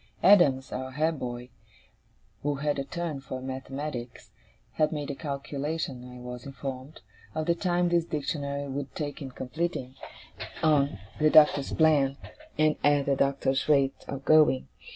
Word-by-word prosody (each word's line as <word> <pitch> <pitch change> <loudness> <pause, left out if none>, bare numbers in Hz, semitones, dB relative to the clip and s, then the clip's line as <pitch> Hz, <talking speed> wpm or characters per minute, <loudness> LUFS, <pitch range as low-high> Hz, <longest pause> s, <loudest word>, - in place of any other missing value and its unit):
Adams, 145 -10 +5
our 130 +1 -4
head 155 +1 0
boy, 120 0 -5 0.9
who 145 0 0
had 145 0 -1
a - - -1
turn 165 -1 -4
for 135 -1 -6
mathematics, 130 -1 -6 0.4
had 155 -1 +1
made 150 -2 -3
a - - -5
calculation, 140 -2 -4
I 125 - -10
was 125 0 -7
informed, 135 +1 -7 0.3
of 155 0 -1
the 170 - +3
time 175 0 +1
this 170 -1 +2
Dictionary 140 -2 -3
would 140 0 -5
take 145 0 -4
in 135 - -5
completing, 130 0 -4 0.7
on 145 -5 +3 0.2
the 155 0 +5
Doctor's 150 -2 +5
plan, 145 -4 +3 0.4
and 155 0 +3
at 145 -1 +4
the 140 - +2
Doctor's 135 0 +1
rate 135 -2 +2
of 140 0 -6
going. 155 -4 +4
140 Hz, 150 wpm, -28 LUFS, 135-155 Hz, 0.9 s, Adams